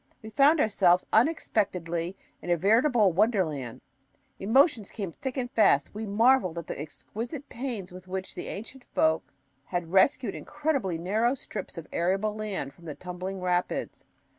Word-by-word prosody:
We 220 - -8
found 285 +8 +5
ourselves 185 -6 +3
unexpectedly 185 - +1 0.2
in - - -7
a 175 - +3
veritable 220 - +4
wonderland. 160 - 0 0.6
Emotions 230 - +3
came 195 -6 -5
thick 265 - -5
and 245 -1 -2
fast. 145 -10 +3
We 215 +1 -5
marveled 215 -4 +3
at 170 - -4
the - - -6
exquisite 235 - -7
pains 230 -7 -5
with 185 +1 -11
which 190 0 -4
the - - -6
ancient 240 +5 -7
folk 160 0 +2 0.3
had 175 -2 -3
rescued 215 +3 +3
incredibly 280 - -2
narrow 215 +9 +1
strips 250 - -7
of 165 - -6
arable 195 +5 +1
land 200 -10 -4
from 170 - -18
the 150 -3 -6
tumbling 185 +1 -6
rapids. 180 0 -1
195 Hz, 150 wpm, -28 LUFS, 175-235 Hz, 0.6 s, found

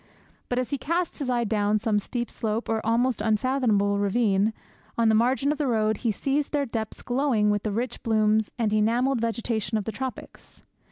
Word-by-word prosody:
But 245 - -1
as 255 +2 -1
he 280 - -1
casts 340 +3 -2
his 275 -3 -2
eye 240 -1 +1
down 210 -1 +1
some 215 -1 +1
steep 240 +3 -4
slope, 220 +1 -2
or 220 -1 0
almost 235 +1 +1
unfathomable 215 -2 +1
ravine, 205 0 +2 0.5
on 230 -1 +3
the - - +4
margin 255 +5 +2
of 300 - -3
the 295 - 0
road, 220 -3 +1
he 230 0 0
sees 275 +6 -1
their 290 -2 0
depths 225 -3 -4
glowing 245 -5 +1
with 205 -1 0
the 215 - -2
rich 240 +4 -3
blooms 215 -1 +2
and 220 -3 0
enamelled 235 +4 +2
vegetation 225 -2 -1
of 210 - -2
the 220 - -4
tropics. 260 +4 -8
225 Hz, 190 wpm, -26 LUFS, 215-255 Hz, 0.5 s, the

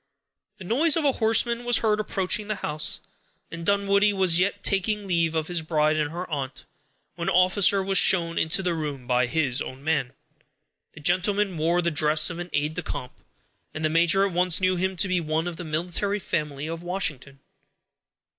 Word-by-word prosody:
The 190 - -10
noise 285 - +2
of 315 - -1
a 280 - +4
horseman 235 0 +1
was 240 -1 +4
heard 215 -1 +1
approaching 205 0 -2
the 215 - -2
house, 150 -4 -2 0.5
and 170 0 -7
Dunwoodie 200 +2 +2
was 185 -3 +3
yet 195 +3 -1
taking 205 +2 0
leave 170 -3 0
of 160 -1 0
his 175 0 -2
bride 155 -1 +1
and 150 -1 -1
her 175 +3 -6
aunt, 135 -4 -5 0.5
when 170 +2 -3
an 190 - 0
officer 190 +2 +4
was 195 0 +3
shown 170 -2 +2
into 160 +4 0
the 180 -1 0
room 145 -5 -5
by 125 0 +1
his 135 -2 -1
own 130 +1 -8
man. 140 -5 -1 0.8
The - - -13
gentleman 185 +4 +1
wore 170 +3 +1
the 170 - 0
dress 155 +1 +3
of 170 - -7
an 175 0 -6
aid 150 +1 -1
de - - -4
camp, 125 - -6 0.6
and 155 0 -2
the 155 - 0
major 170 +4 +3
at 195 - -3
once 180 -1 +3
knew 185 0 +1
him 190 +1 -1
to 190 - +1
be 185 -1 0
one 160 +1 -2
of 170 -2 -6
the 180 - -6
military 175 +6 -1
family 150 -6 -3
of 165 +1 -5
Washington. 155 -7 -4
175 Hz, 195 wpm, -25 LUFS, 155-195 Hz, 0.8 s, a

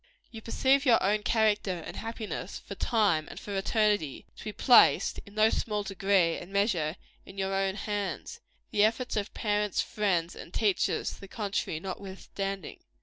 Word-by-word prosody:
You 225 - -9
perceive 265 +5 +2
your 245 -5 +6
own 210 +2 +2
character 210 -4 +1
and - - -7
happiness, 225 -1 -5
for - - -9
time 200 -10 +1
and - - -8
for 205 - -6
eternity, 205 - +1
to - - -10
be 215 - -3
placed, 245 +3 +5
in 200 - -14
no 215 +1 +4
small 210 -2 -1
degree 195 -3 +2
and 175 - -11
measure, 190 -6 +1 0.3
in 195 - -13
your 195 0 -1
own 195 0 0
hands 205 - -4 0.3
the 205 - +3
efforts 230 +4 +1
of 210 -1 -2
parents, 210 -1 0
friends 180 -6 0
and - - -10
teachers 205 -2 +1
to - - -13
the 195 - -9
contrary 200 -6 -2
notwithstanding. 195 0 -6
205 Hz, 165 wpm, -29 LUFS, 195-215 Hz, 0.3 s, your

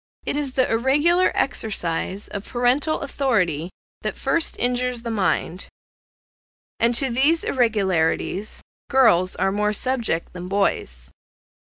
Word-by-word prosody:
It - - -1
is 285 -3 -3
the 260 -1 +2
irregular 295 +10 +3
exercise 195 -5 -2
of 200 0 -6
parental 255 +6 +1
authority 185 - 0 0.3
that - - -3
first 335 -1 0
injures 245 -1 -1
the 230 - -3
mind, 190 -3 -1 1.1
and 235 +1 +3
to 265 +1 +2
these 285 +7 +3
irregularities 195 -4 0 0.3
girls 205 -9 +4
are 195 - 0
more 210 +1 0
subject 230 -7 -2
than 180 0 -7
boys. 180 - -1
230 Hz, 120 wpm, -22 LUFS, 190-265 Hz, 1.1 s, girls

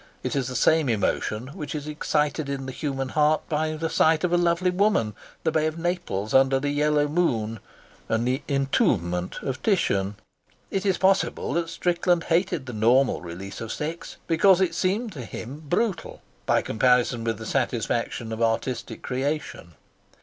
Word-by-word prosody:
It - - -2
is 135 -3 0
the 130 - -5
same 160 -1 +3
emotion 110 +2 -1
which 150 +1 -6
is 145 -1 -4
excited 150 0 -1
in 135 -1 -3
the 130 - -5
human 135 -1 -3
heart 150 +2 +2
by 155 0 0
the 160 +1 -2
sight 160 0 +3
of 180 -1 +1
a - - +6
lovely 175 +1 +2
woman, 180 - +2 0.3
the 160 - +1
Bay 155 0 +2
of 155 +1 -4
Naples 170 - -2
under 135 0 +5
the 145 +1 -1
yellow 150 0 +2
moon, 115 -9 0 0.5
and 115 +2 +1
the 130 +3 0 1.0
of 130 0 -3
Titian. 105 - +1 0.6
It 195 +1 -1
is 190 -2 +2
possible 195 0 +1
that 170 0 -1
Strickland 175 -1 +1
hated 170 -4 0
the 125 - -7
normal 120 +5 +3
release 90 +4 -8
of 115 -1 -5
sex 160 +3 -5
because 180 +3 +4
it 185 -3 +1
seemed 200 +6 0
to 140 -8 -7
him 130 +6 -7
brutal 195 -1 -1 0.2
by - - +3
comparison 125 0 +2
with 115 -1 -1
the 110 - -8
satisfaction 120 -2 -1
of 110 +1 -4
artistic 115 +2 -1
creation. 130 - -3
145 Hz, 165 wpm, -25 LUFS, 120-170 Hz, 1.0 s, a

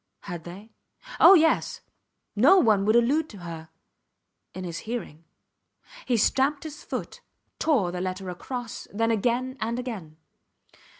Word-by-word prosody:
Had 175 -2 -7
they? 195 +6 -10 0.5
Oh, 390 - +9
yes. 320 -2 +2 0.5
No 275 - +6
one 215 - +3
would 215 +2 +3
allude 285 +7 +2
to 205 - -11
her... 165 -3 -8 0.8
in 185 - -7
his 170 -2 -5
hearing. 215 -9 -6 0.8
He 245 - +2
stamped 275 +6 +2
his 310 -2 -9
foot, - - -6 0.4
tore 255 - +2
the 180 0 -4
letter 185 +1 -4
across, 240 +6 -6
then 225 +3 0
again 245 +4 0
and 230 +2 -1
again. 205 -12 -6
225 Hz, 135 wpm, -26 LUFS, 185-255 Hz, 0.8 s, Oh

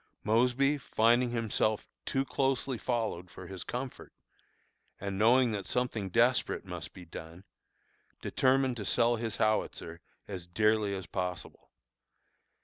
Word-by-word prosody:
Mosby, 125 +6 +3
finding 120 0 +3
himself 110 -2 0 0.2
too 135 0 +1
closely 135 -2 0
followed 110 -8 -2
for 95 - -10
his 95 0 -7
comfort, 125 +1 -6 0.9
and 100 0 -3
knowing 120 +2 +5
that 100 -3 -3
something 115 -6 -1
desperate 120 +6 +2
must - - -6
be 90 - -12
done, 80 +2 -10 0.8
determined 130 -1 +2
to 105 - -4
sell 120 +4 +3
his 115 -1 -3
howitzer 90 -6 -1 0.3
as 90 -4 -6
dearly 105 +2 +2
as 95 -2 -5
possible. 90 -1 -5
110 Hz, 125 wpm, -31 LUFS, 95-125 Hz, 0.9 s, knowing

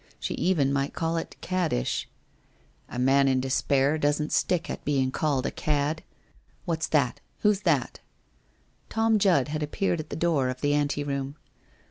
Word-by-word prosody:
She - - -3
even 150 -7 +1
might 140 0 -1
call 165 0 -1
it 165 - -5
caddish/ 180 - -1 0.4
' - - -36 0.3
A - - -7
man 135 +2 +4
in 130 -1 +3
despair 135 +3 +1
doesn't 150 +1 0
stick 175 -2 +1
at - - -5
being 135 -3 +1
called 140 -2 0
a - - -1
cad. 150 +1 -1 0.6
What's 160 -2 -1
that? 140 -6 +1 0.2
Who 210 - +5
is 200 -1 -2
that?' - - +1 0.9
Tom 225 -1 +2
Judd 170 -9 +3
had 155 +1 -3
appeared 170 +3 -1
at 155 - -6
the - - -4
door 160 -6 +1
of 130 0 -5
the 145 0 +2
anteroom. 145 -1 -1
145 Hz, 165 wpm, -27 LUFS, 135-165 Hz, 0.9 s, Who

